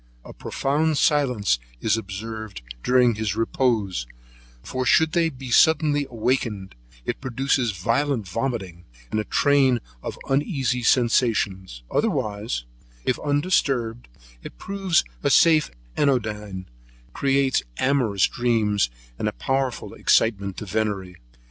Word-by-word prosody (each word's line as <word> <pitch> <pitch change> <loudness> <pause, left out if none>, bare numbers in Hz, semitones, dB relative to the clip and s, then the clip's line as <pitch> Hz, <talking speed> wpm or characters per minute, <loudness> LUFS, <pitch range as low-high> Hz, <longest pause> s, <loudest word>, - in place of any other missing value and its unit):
A - - -10
profound 150 +3 0
silence 125 - +2 0.2
is 110 - +2
observed 110 - -6 0.2
during 125 - +4
his 105 -2 -2
repose; 110 - 0 0.6
for 130 - -3
should 160 +5 +4
they 165 -1 +2
be 130 -3 -9
suddenly 150 0 +4
awaked, 115 -4 -1 0.3
it - - -3
produces 130 -2 0
violent 115 +4 0
vomiting, 95 -5 -4 0.3
and 110 - 0
a - - -1
train 135 +1 +3 0.2
of - - -6
uneasy 135 - 0
sensations; 105 - +1
but, - - -3
otherwise, 105 - -2 0.4
if 125 - 0
undisturbed, 140 -6 0 0.3
it - - -10
proves 195 -4 +1 0.2
a 140 - +1
safe 155 +2 +5 0.3
anodyne, 105 -8 -1 0.5
creates 135 -1 +2 0.2
amorous 125 -8 +2
dreams, 110 - +1 0.3
and - - -1
a - - 0
powerful 135 - -2
excitement 100 -4 +1
to 105 - -5
venery. 100 -3 -2
120 Hz, 115 wpm, -24 LUFS, 105-135 Hz, 0.6 s, safe